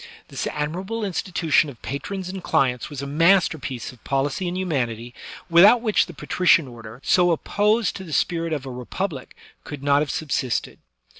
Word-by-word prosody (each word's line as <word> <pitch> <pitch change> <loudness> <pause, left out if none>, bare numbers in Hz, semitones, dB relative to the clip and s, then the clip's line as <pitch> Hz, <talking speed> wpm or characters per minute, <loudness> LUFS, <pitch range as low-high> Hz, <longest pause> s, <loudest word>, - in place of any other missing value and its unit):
This - - -3
admirable 185 +10 -3
institu* 180 -4 -3
tion 150 - +5
of 125 -5 -12
patrons 185 +7 -5
and 190 0 -6
clients 125 -2 +1
was 140 -2 -6
a - - -3
masterpiece 155 - +1
of 125 - -21
policy 140 +6 -1
and 175 +1 -3
humanity, 120 -10 -2 0.3
without 190 +8 +7
which 215 -3 +2
the 175 - -10
patrician 165 +1 +3
order, 115 -1 -11
so 180 -1 +4
op* 165 - 0
posed 210 +1 +1
to 190 - -8
the 170 - -10
spirit 165 +3 0
of 145 -4 -3
a 130 - -6
republic, 130 +4 -5 0.3
could 145 -2 -8
not 140 0 +4
have 150 - -2
sub 155 +2 -4
sisted. 130 -2 -1
155 Hz, 180 wpm, -23 LUFS, 135-185 Hz, 0.3 s, without